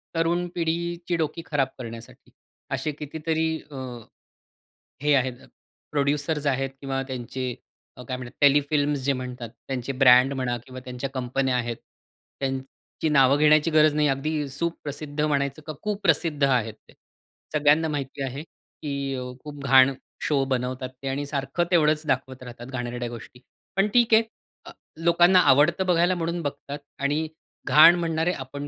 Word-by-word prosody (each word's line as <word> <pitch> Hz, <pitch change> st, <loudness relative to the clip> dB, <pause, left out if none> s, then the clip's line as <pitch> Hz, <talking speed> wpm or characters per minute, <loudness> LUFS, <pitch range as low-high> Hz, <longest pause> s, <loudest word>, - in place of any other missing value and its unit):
तरुण 170 Hz, +2 st, +1 dB
पिढीची 170 Hz, +1 st, -2 dB
डोकी 160 Hz, +1 st, -2 dB
खराब 140 Hz, -3 st, +1 dB
करण्यासाठी. 115 Hz, -2 st, -10 dB, 0.4 s
असे 155 Hz, -, -1 dB
कितीतरी 160 Hz, +2 st, -2 dB, 0.2 s
अ, -, -, -9 dB, 1.3 s
हे 150 Hz, 0 st, +3 dB
आहेत 130 Hz, -2 st, +1 dB, 0.6 s
प्रोड्युसर्स 145 Hz, +1 st, 0 dB
आहेत 135 Hz, 0 st, 0 dB
किंवा 135 Hz, -1 st, -2 dB
त्यांचे 130 Hz, 0 st, -4 dB, 0.4 s
अ, 125 Hz, -, -9 dB
काय 130 Hz, -, -3 dB
म्हणतात 125 Hz, 0 st, -10 dB
टेलीफिल्म्स 145 Hz, 0 st, +3 dB
जे 140 Hz, -, +3 dB
म्हणतात. 125 Hz, -3 st, -6 dB, 0.2 s
त्यांचे 130 Hz, 0 st, -3 dB
ब्रँड 125 Hz, +2 st, +7 dB
म्हणा 125 Hz, -2 st, -2 dB
किंवा 130 Hz, 0 st, -9 dB
त्यांच्या 125 Hz, +2 st, -5 dB
कंपन्या 130 Hz, 0 st, -1 dB
आहेत. 120 Hz, -1 st, -2 dB, 0.6 s
त्यांची 135 Hz, +3 st, -4 dB
नावं 140 Hz, -1 st, +5 dB
घेण्याची 155 Hz, +1 st, +4 dB
गरज 155 Hz, -1 st, +5 dB
नाही. 150 Hz, -1 st, +3 dB
अगदी 145 Hz, +2 st, -1 dB
सुप्रसिद्ध 150 Hz, -1 st, -4 dB
म्हणायचं 140 Hz, 0 st, -1 dB
का 155 Hz, -, -4 dB
कुप्रसिद्ध 170 Hz, -7 st, +1 dB
आहेत 125 Hz, -5 st, +2 dB, 0.2 s
ते. -, -, -17 dB, 0.6 s
सगळ्यांना 150 Hz, +2 st, +4 dB
माहिती 140 Hz, -2 st, -4 dB
आहे, 135 Hz, +3 st, -5 dB
की 140 Hz, -4 st, -6 dB
अ, 130 Hz, -, -4 dB, 0.2 s
खूप 145 Hz, -2 st, -9 dB
घाण 135 Hz, 0 st, +6 dB, 0.3 s
शो 140 Hz, -3 st, +2 dB
बनवतात 130 Hz, 0 st, -2 dB
ते 135 Hz, -, -5 dB
आणि 140 Hz, +2 st, -2 dB
सारखं 140 Hz, +3 st, -2 dB
तेवढंच 155 Hz, -3 st, +3 dB
दाखवत 130 Hz, -1 st, -2 dB
राहतात 120 Hz, -1 st, -10 dB
घाणेरड्या 120 Hz, -1 st, -4 dB
गोष्टी. 120 Hz, +1 st, -10 dB, 0.4 s
पण 195 Hz, +2 st, +4 dB
ठीक 240 Hz, -2 st, +4 dB
आहे 220 Hz, +1 st, +7 dB, 0.4 s
अ, -, -, -9 dB, 0.3 s
लोकांना 175 Hz, +2 st, +5 dB
आवडतं 155 Hz, +7 st, +4 dB
बघायला 175 Hz, 0 st, +3 dB
म्हणून 170 Hz, 0 st, -2 dB
बघतात 145 Hz, -1 st, -5 dB, 0.2 s
आणि 150 Hz, +3 st, 0 dB, 0.4 s
घाण 160 Hz, +3 st, +8 dB
म्हणणारे 165 Hz, 0 st, 0 dB
आपण 140 Hz, +2 st, -7 dB
145 Hz, 145 wpm, -25 LUFS, 130-155 Hz, 1.3 s, घाण